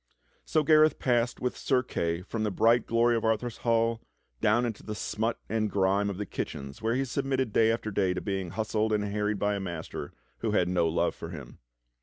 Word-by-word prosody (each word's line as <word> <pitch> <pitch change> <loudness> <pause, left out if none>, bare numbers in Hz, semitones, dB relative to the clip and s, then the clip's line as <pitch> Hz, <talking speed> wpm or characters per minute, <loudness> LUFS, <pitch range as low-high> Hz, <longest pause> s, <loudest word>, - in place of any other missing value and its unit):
So 155 - +2
Gareth 155 +1 +5
passed 120 -1 +1
with 125 - -1
Sir 130 -2 +1
Kay 85 -7 -2
from 110 +3 -4
the 105 - +1
bright 115 +5 +3
glory 115 +1 +3
of 115 - -1
Arthur's 110 +1 0
hall 115 -1 +1 0.4
down 120 +4 +3
into 115 -3 -4
the 105 - -6
smut 110 +3 -2
and 110 -1 0
grime 100 +1 +2
of 100 - -4
the 105 - -3
kitchens 70 -3 -6
where 115 +2 +1
he 135 +1 0
submitted 130 -3 -1
day 110 0 +4
after 115 -1 -2
day 95 -2 +1
to - - -1
being 95 -3 -3
hustled 110 +3 -1
and 105 -1 +1
harried 105 +1 -1
by 105 +1 +1
a 100 - -2
master 85 -4 -5 0.3
who - - -1
had 90 - +3
no 90 -2 +2
love* 80 - +1
for - - -8
him. - - -9
110 Hz, 210 wpm, -28 LUFS, 100-120 Hz, 0.4 s, Gareth